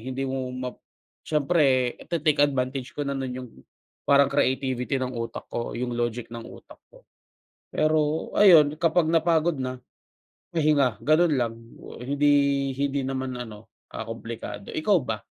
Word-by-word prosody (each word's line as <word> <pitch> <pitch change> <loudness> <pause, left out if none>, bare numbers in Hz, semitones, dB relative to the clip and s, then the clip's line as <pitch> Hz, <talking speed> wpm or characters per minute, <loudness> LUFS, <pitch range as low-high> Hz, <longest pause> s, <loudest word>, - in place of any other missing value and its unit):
Hindi 130 +1 -3
mo 130 -1 -3
map 125 0 -5 0.5
siyempre 140 -5 +2
ite-take 155 -3 +1
advantage 130 -2 -2
ko 145 - -3
na 140 0 -2
no’n 130 -2 -3
yung 125 -1 -7 0.6
parang 140 -1 +5
creativity 130 0 0
ng 130 -1 -3
utak 115 0 -5
ko, 115 - -4
yung 120 0 -3
logic 120 0 -2
ng 115 0 -8
utak - - -13 0.2
ko. - - -18 0.7
Pero 155 0 +1
ayun 155 -7 +7
kapag 165 -1 +2
napagod 165 0 +2
na, 130 -1 -4 0.7
pahinga. 145 -8 +2
Ganun 155 +2 +3
lang, 120 -4 0 0.5
hindi 145 +2 +3 0.4
hindi 140 0 0
naman 130 -1 -3
ano, 110 -3 -8 0.3
ah, 110 - -5
kumplikado. 115 -3 -7
Ikaw 190 +4 +3
ba? 110 -3 -3
135 Hz, 140 wpm, -25 LUFS, 125-150 Hz, 0.7 s, ayun